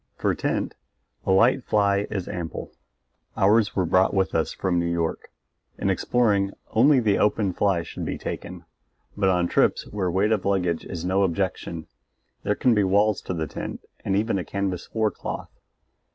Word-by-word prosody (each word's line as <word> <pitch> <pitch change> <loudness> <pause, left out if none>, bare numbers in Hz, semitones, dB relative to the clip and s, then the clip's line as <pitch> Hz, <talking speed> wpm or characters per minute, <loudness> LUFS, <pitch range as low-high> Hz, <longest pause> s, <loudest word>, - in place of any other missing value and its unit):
For - - +1
tent - - -2 0.5
a - - +3
light 120 +7 +4
fly 100 -2 +2
is 95 -4 -3
ample; 85 -3 -5 0.7
ours 105 +2 +3
were 95 - +1
brought 95 +4 +3
with 95 -1 +1
us 80 - 0
from 90 -2 0
New 85 0 0
York. 85 -1 -2 0.5
In - - +1
exploring 100 -5 +1 0.2
only 135 +5 +5
the 105 -4 +2
open 105 -2 +2
fly 95 -3 +1
should - - -7
be - - -3
taken; 90 -2 -6 0.5
but 100 -2 +2
on 90 -1 +2
trips - - +2
where 100 -3 -1
weight 95 +5 +1
of 105 -4 +1
luggage 90 -4 0
is 85 -2 -5
no 95 +2 +2
objection, 90 -3 -2 0.6
there 105 - 0
can 125 - +3
be 105 -2 +3
walls 100 +2 +2
to 90 - -4
the 80 -1 -1
tent - - -7 0.2
and 95 - 0
even 105 -1 +1
a - - -3
canvas 95 +1 -3
floor 110 -2 0
cloth. - - -6
95 Hz, 175 wpm, -25 LUFS, 90-105 Hz, 0.7 s, only